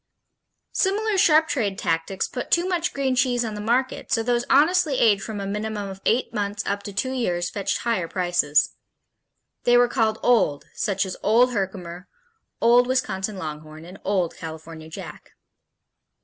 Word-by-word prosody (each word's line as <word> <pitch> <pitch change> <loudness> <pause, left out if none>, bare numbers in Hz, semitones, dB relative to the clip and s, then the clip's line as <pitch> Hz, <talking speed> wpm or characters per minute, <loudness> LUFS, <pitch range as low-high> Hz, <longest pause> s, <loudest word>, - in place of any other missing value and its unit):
Similar 420 +2 +1
sharp 315 -2 +5
trade 205 -10 -1
tactics 165 +3 -1
put 250 - -6
too 345 +1 +2
much 355 -2 0
green 270 -2 -1
cheese 245 -2 +1
on 220 - -4
the 210 - -5
market, 245 +5 -1
so 225 - +2
those 240 0 0
honestly 310 0 +4
aged 205 -4 +4
from 215 -2 -5
a 200 - -4
minimum 210 0 -3
of 195 0 -9
eight 240 +1 +1
months 205 -1 -2
up 200 0 -2
to 205 - -7
two 260 +6 -2
years 180 -9 -1
fetched 200 -2 -1
higher 225 -8 -1
prices. 175 -5 +1 0.9
They 245 0 +5
were 245 0 +5
called 225 -3 0
"old," 215 -12 +2
such 195 -1 -1
as 185 - -6
Old 240 +4 +4
Herkimer, 185 -3 -4 0.5
Old 240 +1 +5
Wisconsin 210 -6 -1
Longhorn, 155 -1 -7
and 185 +3 -12
Old 185 -4 0
California 160 0 -9
Jack. - - -10
210 Hz, 165 wpm, -24 LUFS, 185-250 Hz, 0.9 s, sharp